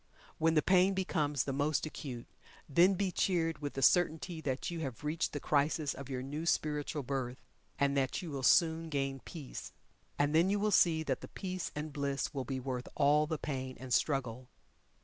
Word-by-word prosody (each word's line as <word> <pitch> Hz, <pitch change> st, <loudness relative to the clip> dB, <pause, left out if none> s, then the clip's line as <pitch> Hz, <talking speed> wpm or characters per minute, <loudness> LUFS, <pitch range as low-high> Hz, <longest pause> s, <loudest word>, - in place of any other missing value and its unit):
When 165 Hz, +1 st, +3 dB
the 155 Hz, -, +4 dB
pain 190 Hz, +1 st, +4 dB
becomes 150 Hz, -7 st, 0 dB
the 135 Hz, -, -3 dB
most 145 Hz, +3 st, +1 dB
acute, 130 Hz, -6 st, -6 dB, 0.4 s
then 175 Hz, +7 st, +5 dB
be 190 Hz, 0 st, 0 dB
cheered 165 Hz, -3 st, 0 dB
with 145 Hz, -1 st, -5 dB
the 135 Hz, -, -1 dB
certainty 170 Hz, 0 st, +3 dB
that 135 Hz, +2 st, -2 dB
you 170 Hz, -, -4 dB
have 135 Hz, -4 st, -5 dB
reached 155 Hz, +4 st, -1 dB
the 145 Hz, -, -4 dB
crisis 145 Hz, +1 st, +1 dB
of 140 Hz, -1 st, -9 dB
your 130 Hz, -1 st, -3 dB
new 150 Hz, +5 st, -4 dB
spiritual 150 Hz, -2 st, 0 dB
birth, 130 Hz, -1 st, -4 dB, 0.3 s
and 140 Hz, -1 st, +2 dB
that 135 Hz, -2 st, 0 dB
you 170 Hz, -4 st, -6 dB
will 140 Hz, -2 st, -4 dB
soon 165 Hz, +3 st, +4 dB
gain 135 Hz, -2 st, -1 dB
peace. 145 Hz, -1 st, -8 dB, 0.4 s
And 145 Hz, +1 st, +2 dB
then 165 Hz, +4 st, +4 dB
you 205 Hz, +1 st, +1 dB
will 210 Hz, +1 st, +1 dB
see 165 Hz, -4 st, +4 dB
that 135 Hz, -4 st, -2 dB
the -, -, -8 dB
peace 185 Hz, -3 st, -5 dB
and 150 Hz, 0 st, -4 dB
bliss 140 Hz, -1 st, -2 dB
will 135 Hz, -3 st, -3 dB
be 135 Hz, -1 st, -3 dB
worth 125 Hz, -1 st, -4 dB
all 150 Hz, +1 st, +4 dB
the 160 Hz, 0 st, -2 dB
pain 130 Hz, -3 st, -4 dB
and 130 Hz, -1 st, -4 dB
struggle. 130 Hz, -3 st, 0 dB
150 Hz, 195 wpm, -33 LUFS, 135-165 Hz, 0.4 s, then